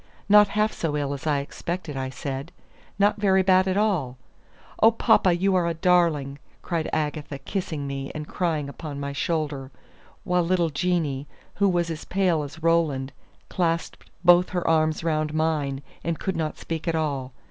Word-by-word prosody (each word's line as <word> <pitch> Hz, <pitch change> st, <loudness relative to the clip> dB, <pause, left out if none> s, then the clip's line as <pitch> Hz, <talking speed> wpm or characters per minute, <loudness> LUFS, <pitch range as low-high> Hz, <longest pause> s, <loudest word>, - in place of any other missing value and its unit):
"Not 210 Hz, 0 st, +7 dB
half 215 Hz, +1 st, +2 dB
so 150 Hz, -3 st, -2 dB
ill 140 Hz, -1 st, -1 dB
as 140 Hz, +2 st, -6 dB
I 145 Hz, -2 st, +2 dB
expected," 170 Hz, +2 st, -5 dB
I 130 Hz, -1 st, -3 dB
said; 135 Hz, +3 st, -5 dB, 0.5 s
"not 205 Hz, +1 st, +3 dB
very 190 Hz, -2 st, +4 dB
bad 185 Hz, 0 st, +4 dB
at 190 Hz, +1 st, 0 dB
all." 175 Hz, -12 st, 0 dB, 0.6 s
"Oh, 225 Hz, -, +8 dB
papa, 225 Hz, -4 st, +3 dB
you 190 Hz, +3 st, +1 dB
are 180 Hz, -2 st, +2 dB
a 170 Hz, -, -1 dB
darling!" 160 Hz, -6 st, +2 dB, 0.2 s
cried 165 Hz, -3 st, -2 dB
Agatha, 150 Hz, -2 st, -2 dB
kissing 155 Hz, 0 st, -4 dB
me, 135 Hz, 0 st, -4 dB
and 155 Hz, 0 st, -5 dB
crying 160 Hz, -5 st, -1 dB
upon 140 Hz, 0 st, -7 dB
my 140 Hz, 0 st, -4 dB
shoulder; 145 Hz, -3 st, -2 dB, 0.5 s
while 180 Hz, 0 st, +2 dB
little 170 Hz, -1 st, +1 dB
Jeanie, 150 Hz, -3 st, -1 dB, 0.3 s
who 200 Hz, +1 st, +3 dB
was 175 Hz, -2 st, 0 dB
as 160 Hz, -1 st, -6 dB
pale 180 Hz, -4 st, +1 dB
as 150 Hz, +2 st, -8 dB
Roland, 155 Hz, -5 st, +1 dB, 0.4 s
clasped 170 Hz, -2 st, -2 dB, 0.2 s
both 175 Hz, +1 st, +6 dB
her 180 Hz, -1 st, -2 dB
arms 155 Hz, -1 st, +2 dB
round 155 Hz, -2 st, 0 dB
mine, 150 Hz, -4 st, 0 dB, 0.2 s
and 170 Hz, -1 st, -1 dB
could 190 Hz, -, -3 dB
not 155 Hz, -2 st, -2 dB
speak 165 Hz, 0 st, -5 dB
at 165 Hz, -, +1 dB
all. 140 Hz, -5 st, -2 dB
160 Hz, 170 wpm, -25 LUFS, 145-180 Hz, 0.6 s, Oh